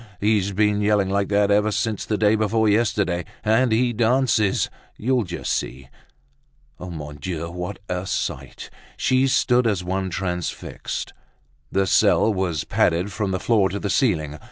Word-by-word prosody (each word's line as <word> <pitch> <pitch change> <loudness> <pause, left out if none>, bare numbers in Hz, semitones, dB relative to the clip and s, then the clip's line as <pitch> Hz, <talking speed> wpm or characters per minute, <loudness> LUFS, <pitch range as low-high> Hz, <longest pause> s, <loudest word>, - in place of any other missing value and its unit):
He's 105 -1 +1
been 105 +1 +1
yelling 105 -2 +2
like 100 0 +1
that 100 0 +2
ever 105 +1 +3
since 110 0 -2
the 105 - -1
day 105 +1 +3
before 110 0 +1
yesterday; 105 -5 +1 0.2
and 115 +3 +3
he 120 +2 +2
dances, 115 -3 +2 0.3
you'll 125 0 0
just 85 - -3
see." 65 +1 -4 0.9
Mon 75 -5 -7
Dieu! 85 +2 -5
what 90 0 -5
a 90 +1 -3
sight! - - -4 0.3
She 130 +1 +2
stood 125 -2 +3
as 100 -5 0
one 95 +1 -2
transfixed. 90 -2 -4 0.6
The 95 0 +2
cell 100 +2 +3
was 90 -7 -1
padded 90 +5 +1
from 100 +1 -2
the 95 -1 -1
floor 105 -3 +2
to 100 - -4
the 100 -1 -2
ceiling. 80 - 0
100 Hz, 155 wpm, -22 LUFS, 90-110 Hz, 0.9 s, ever